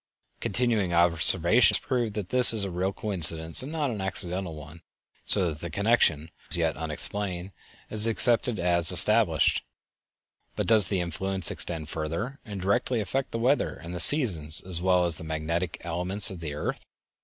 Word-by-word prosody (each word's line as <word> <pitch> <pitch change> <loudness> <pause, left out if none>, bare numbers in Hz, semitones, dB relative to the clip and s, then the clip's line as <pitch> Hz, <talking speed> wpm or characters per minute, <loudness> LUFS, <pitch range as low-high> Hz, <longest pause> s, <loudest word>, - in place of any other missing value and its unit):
Continued 115 -7 -2
observation 85 +5 +4
has - - +1
proved 120 -5 -3
that 100 -4 -6
this 125 -2 +8
is 105 -3 -1
a 95 - -6
real 90 +2 -3
coincidence 85 -6 +2
and 135 +4 -8
not 150 -5 -3
an 105 -4 -6
accidental 90 -2 -2
one, 75 +2 -13 0.5
so 95 - 0
that 80 -3 -5
the 85 - -7
connection, 100 -4 +1
although 80 +2 -15 0.2
as - - +10
yet 80 -2 -1
unexplained, 90 +4 -3 0.4
is 110 +1 +5
accepted 115 0 +1
as 85 -1 +1
established. 90 -3 +3 0.9
But - - -3
does 110 -5 +2
the 95 -2 -2
influence 95 +2 -3
extend 80 -3 -7
further, 85 - -6
and 105 -4 -9
directly 110 +6 -1
affect 130 +5 -4
the - - -6
weather 125 +5 -1
and 85 +1 -11
the 90 - -6
seasons 85 - +1
as 90 -2 -5
well 90 -1 +1
as 85 -3 -1
the - - -10
magnetic 80 +2 -4
elements 90 +5 -2
of 95 - -10
the 75 -3 -7
earth? 75 - -5
90 Hz, 175 wpm, -25 LUFS, 85-110 Hz, 0.9 s, as